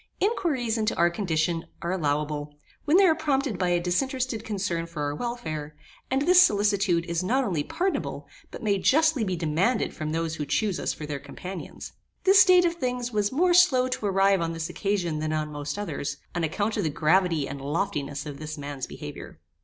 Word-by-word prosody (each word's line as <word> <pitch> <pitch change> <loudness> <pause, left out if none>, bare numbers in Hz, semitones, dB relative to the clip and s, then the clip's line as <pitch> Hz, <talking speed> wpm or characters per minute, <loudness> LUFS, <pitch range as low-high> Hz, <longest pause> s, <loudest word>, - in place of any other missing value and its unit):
Inquiries 285 - 0
into 215 0 0
our 170 0 +3
condition 165 -2 -1 0.2
are 170 - -1
allowable 150 -3 -2 0.3
when 310 +4 +4
they 395 - +6
are 335 - +5
prompted 275 - -1
by 180 -2 +1
a 175 0 +2
disinterested 245 +6 -1
concern 190 -6 -2
for 165 -3 -5
our 145 0 -1
welfare; 155 -9 -5 0.3
and 265 +2 +1
this 360 +3 +7
solicitude 200 - +2
is 170 +1 -2
not 255 +8 +1
only 175 - -1
pardonable, 360 - -2 0.2
but - - -9
may 200 -2 +1
justly 310 +3 +3
be 185 -3 -1
demanded 170 +8 0
from 155 -1 -4
those 165 0 -2
who 150 - -3
chuse 210 +2 0
us - - -1
for 155 - -7
their 145 -1 -4
companions. 180 +7 -8 0.3
This 385 0 +7
state 365 -1 +6
of 340 - +2
things 250 -3 -2
was 210 -2 0
more 350 +6 +3
slow 280 -8 +5
to 255 -4 -3
arrive 195 -1 +3
on 165 0 -1
this 165 0 -4
occasion 180 -6 -1
than 155 0 -2
on 155 -1 -2
most 145 +1 -5
others, 160 -8 -4 0.2
on 175 - -2
account 205 +8 -1
of 205 - 0
the 160 - +1
gravity 165 0 +2
and 140 0 -7
loftiness 145 -2 -2
of 145 -2 -7
this 155 0 -6
man's 140 -2 -5
behaviour. - - -9
190 Hz, 195 wpm, -26 LUFS, 155-250 Hz, 0.3 s, this